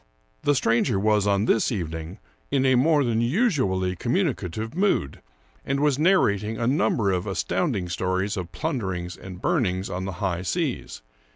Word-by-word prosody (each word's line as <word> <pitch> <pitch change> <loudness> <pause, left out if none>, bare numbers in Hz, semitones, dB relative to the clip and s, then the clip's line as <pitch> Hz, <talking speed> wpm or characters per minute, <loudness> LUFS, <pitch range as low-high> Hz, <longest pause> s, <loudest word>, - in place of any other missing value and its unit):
The 145 - +2
stranger 115 -3 +2
was, 105 0 +2
on 100 +1 +2
this 115 - +2
evening, 80 -2 -4 0.3
in 135 -1 +1
a 130 - +4
more 145 +4 +4
than 115 -2 +1
usu 145 - +2
ally 95 -1 -1
communicative 115 - -2
mood, 185 - 0 0.4
and 140 0 -1
was 145 -1 +2
narrating 110 - +2
a 115 - -1
number 115 -6 +2
of 90 -1 -1
astounding 90 -2 -1
stories 95 +3 -1
of 90 -4 -5
plunderings 95 - -3
and 95 -1 -10
burnings 100 - 0
on 95 +1 -3
the 95 - -4
high 90 -1 -2
seas. 140 - -3
110 Hz, 160 wpm, -25 LUFS, 95-135 Hz, 0.4 s, a